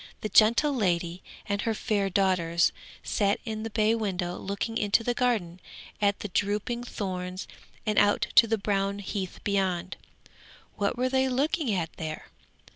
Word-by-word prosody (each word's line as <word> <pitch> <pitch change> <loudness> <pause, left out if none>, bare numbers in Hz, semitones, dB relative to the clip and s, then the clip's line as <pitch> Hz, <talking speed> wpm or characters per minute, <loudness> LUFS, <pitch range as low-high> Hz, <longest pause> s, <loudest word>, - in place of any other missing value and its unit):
The 215 - -3
gentle 235 +9 +5
lady 175 -6 0 0.3
and 200 0 -1
her 225 -1 -1
fair 205 -3 0
daughters 175 -3 +2 0.3
sat 200 -1 +1
in 220 -2 -4
the 225 - -4
bay 215 +1 +2
window 185 -5 -2
looking 200 +3 -4
into 215 0 +2
the 245 - 0
garden 220 -9 0 0.4
at 200 -1 +2
the - - -3
drooping 210 +6 -1
thorns 185 -4 -4 0.4
and 215 -1 +3
out 205 0 +3
to 230 - +7
the 225 0 +1
brown 200 -1 0
heath 195 -2 -5
beyond. 190 -3 -1 0.8
What 205 +3 -1
were 255 +1 +1
they 265 0 +2
looking 275 +1 0
at 170 -3 -2
there? 155 -1 -6
205 Hz, 155 wpm, -28 LUFS, 185-225 Hz, 0.8 s, to